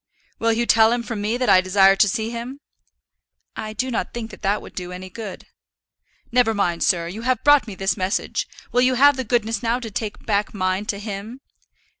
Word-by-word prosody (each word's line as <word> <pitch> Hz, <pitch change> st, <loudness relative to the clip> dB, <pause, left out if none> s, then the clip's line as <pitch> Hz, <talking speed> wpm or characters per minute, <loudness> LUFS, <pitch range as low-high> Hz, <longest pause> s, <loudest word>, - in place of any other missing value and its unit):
"Will 230 Hz, 0 st, +2 dB
you 235 Hz, +1 st, 0 dB
tell 225 Hz, -1 st, +5 dB
him 240 Hz, 0 st, 0 dB
from 220 Hz, -2 st, -5 dB
me 215 Hz, +3 st, -1 dB
that 250 Hz, 0 st, -1 dB
I 185 Hz, -, +6 dB
desire 195 Hz, +1 st, +5 dB
to 205 Hz, -, +4 dB
see 220 Hz, +2 st, -2 dB
him?" 240 Hz, +4 st, -6 dB, 1.0 s
"I 215 Hz, -, -5 dB
do 255 Hz, +3 st, -2 dB
not 230 Hz, -, -3 dB
think 225 Hz, -2 st, -5 dB
that -, -, -13 dB
that 205 Hz, +1 st, +1 dB
would -, -, -12 dB
do 180 Hz, -1 st, -6 dB
any 185 Hz, +1 st, -8 dB
good." 210 Hz, -1 st, -8 dB, 0.9 s
"Never 235 Hz, -2 st, +3 dB
mind, 175 Hz, -4 st, 0 dB
sir; 170 Hz, -3 st, +2 dB
you 195 Hz, +6 st, -7 dB
have 255 Hz, -1 st, 0 dB
brought 290 Hz, -3 st, +5 dB
me 205 Hz, -, -7 dB
his 195 Hz, +1 st, 0 dB
message; 190 Hz, +1 st, -2 dB, 0.2 s
will 245 Hz, -, +3 dB
you 255 Hz, 0 st, +3 dB
have 285 Hz, +3 st, +6 dB
the 260 Hz, -, -3 dB
goodness 230 Hz, -1 st, 0 dB
now 235 Hz, +1 st, 0 dB
to 225 Hz, -3 st, -7 dB
take 210 Hz, +1 st, -5 dB
back 210 Hz, -1 st, 0 dB
mine 185 Hz, +1 st, -1 dB
to 205 Hz, -, -2 dB
him?" 210 Hz, +4 st, -7 dB
220 Hz, 215 wpm, -22 LUFS, 195-240 Hz, 1.0 s, I